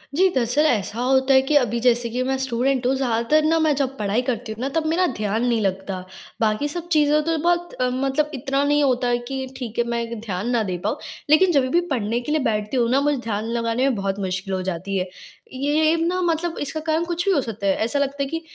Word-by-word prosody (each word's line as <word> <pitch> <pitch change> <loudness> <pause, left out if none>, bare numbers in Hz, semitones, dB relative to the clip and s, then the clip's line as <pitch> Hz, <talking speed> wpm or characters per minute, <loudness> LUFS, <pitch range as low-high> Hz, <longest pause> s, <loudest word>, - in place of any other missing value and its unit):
जी, 375 +3 +5
दरअसल 255 +5 +2
ऐसा 225 -3 0
होता 265 +1 +3
है 265 - +6
कि 270 +3 -1
अभी 240 -4 +2
जैसे 240 -1 +2
कि 245 +2 -2
मैं 265 +1 0
स्टूडेंट 260 0 0
हूँ 265 - +2
ज़्यादातर 260 +4 +1
न 325 +1 +3
मैं 310 -2 +3
जब 270 -1 -1
पढ़ाई 210 +3 0
करती 225 -2 -3
हूँ 220 - -7
ना 265 - -1
तब 325 -1 +1
मेरा 345 +3 +2
ध्यान 215 +3 -1
नहीं 235 -2 +2
लगता। 190 -1 -2 0.4
बाकी 220 +6 +1
सब 345 +3 -5
चीज़ें 300 -1 +4
तो 325 +1 0
बहुत 345 0 +1
अ, 250 0 0
मतलब 270 +4 0
इतना 275 +1 -1
नहीं 290 0 +3
होता 250 -2 +1
है 240 0 +2
कि 265 -1 -4
ठीक 240 -4 -6
है 235 - +4
मैं 235 -1 -3
ध्यान 210 0 -4
ना 235 -2 +1
दे 185 -3 -3
पाऊँ 215 +8 -1 0.3
लेकिन 350 +5 +5
जब 275 -5 +2
भी 345 - +3
पढ़ने 230 -2 0
के 295 - -5
लिए 310 - +2
बैठती 210 +4 -2
हूँ 235 -1 +2
ना 270 +2 +3
मुझे 290 0 +1
ध्यान 215 -1 -2
लगाने 230 +2 0
में 260 - 0
बहुत 195 -1 -2
मुश्किल 190 0 -3
हो 185 - -1
जाती 190 +2 -3
है। 185 0 -2 0.4
ये 300 +4 +2
ना 350 +2 0
मतलब 335 0 -1
इसका 300 +2 -3
कारण 315 +1 0
कुछ 345 0 -2
भी 395 - +3
हो 295 - +3
सकता 220 -4 -4
है। 195 - +4
ऐसा 280 +5 0
लगता 280 0 -1
है 275 - -3
कि 325 +2 -3
260 Hz, 245 wpm, -22 LUFS, 225-295 Hz, 0.4 s, है